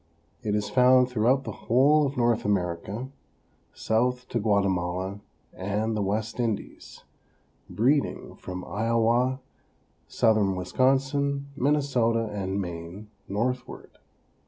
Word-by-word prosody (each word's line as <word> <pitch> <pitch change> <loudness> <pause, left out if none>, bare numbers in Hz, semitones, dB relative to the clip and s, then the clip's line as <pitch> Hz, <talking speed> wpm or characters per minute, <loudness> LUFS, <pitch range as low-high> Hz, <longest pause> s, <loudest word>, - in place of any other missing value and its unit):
It 105 -1 -1
is 105 0 -1
found 125 0 +5
throughout 125 +3 +2
the - - -5 0.2
whole 145 +5 +5
of 140 - -6
North 120 -2 +2
America, 100 +5 -2 0.6
south 125 +3 0
to 120 - -1
Guatemala 95 -2 0 0.3
and 105 +4 -2
the 105 - -1
West 110 +4 -2
Indies; 115 -4 -4 0.7
breeding 135 +6 0
from 90 0 -7
Iowa, 115 +4 +1 0.7
southern 105 -4 +2
Wisconsin, 135 +8 0
Minnesota 130 -5 +1
and 95 -1 -2
Maine 90 +3 -7 0.2
northward. 125 +5 -4
115 Hz, 105 wpm, -26 LUFS, 100-130 Hz, 0.7 s, found